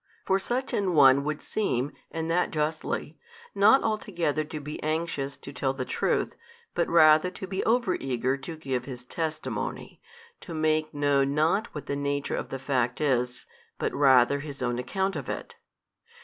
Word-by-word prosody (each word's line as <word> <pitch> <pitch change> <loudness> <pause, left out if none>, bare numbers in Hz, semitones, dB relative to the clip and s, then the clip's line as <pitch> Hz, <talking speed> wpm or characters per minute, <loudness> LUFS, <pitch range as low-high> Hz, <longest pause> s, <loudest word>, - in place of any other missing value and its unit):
For 190 0 +2
such 250 +6 -2
an 190 -4 +1
one 140 -1 +7
would 150 0 -3
seem 145 - -1 0.2
(and 160 0 -3
that 180 +1 +2
justly) 155 0 -2 0.3
not 220 +7 +5
altogether 175 -8 -1
to 155 0 -6
be 150 +1 -7
anxious 155 -3 -2
to 140 - -10
tell 135 0 -1
the 130 -1 -3
truth, - - 0 0.4
but 170 - 0
rather 155 +1 +6
to 190 - -7
be 190 +1 -3
over 230 -4 +2
eager 130 0 -1
to 155 +4 -8
give 130 -5 -3
his 125 -3 -7
testimony, 160 +4 -4 0.4
to 170 - -8
make 155 0 +1
known 145 -1 +1
not 165 +9 +1
what 150 - -5
the 140 - -2
nature 140 0 -1
of - - -4
the 135 - -4
fact 130 -2 -1
is, 125 -4 0 0.3
but - - -2
rather 135 -1 +5
his 140 -2 -6
own 120 0 -1
account 190 +8 -1
of 140 -5 -5
it. - - -5
150 Hz, 170 wpm, -27 LUFS, 135-170 Hz, 0.4 s, one